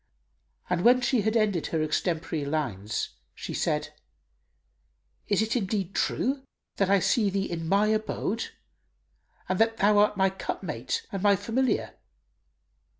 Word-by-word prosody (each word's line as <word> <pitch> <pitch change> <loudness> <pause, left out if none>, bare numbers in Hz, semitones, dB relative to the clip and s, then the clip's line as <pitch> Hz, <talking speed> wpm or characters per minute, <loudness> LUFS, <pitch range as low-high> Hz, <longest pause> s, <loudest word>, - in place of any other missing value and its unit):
And 180 -1 0
when 250 +2 +6
she 245 -2 +2
had 220 +3 +1
ended 205 -7 +1
her 160 -2 0
extempore 160 0 -1
lines 120 -10 -2 0.3
she - - -6
said, - - -1 1.3
"Is 205 +1 +2
it 220 +2 -1
indeed 195 -4 -1
true 270 +2 0 0.4
that 195 -1 +2
I 200 - +6
see 205 +4 +2
thee 195 0 -1
in 165 -1 -4
my 200 +2 +4
abode 215 0 -1 1.0
and 185 - -1
that 225 0 +3
thou 205 0 +4
art 210 0 +3
my 190 -1 +3
cup 190 - -5
mate 460 -1 -3
and 195 - -3
my 205 0 +5
familiar?" 235 +6 -1
200 Hz, 145 wpm, -27 LUFS, 180-220 Hz, 1.3 s, when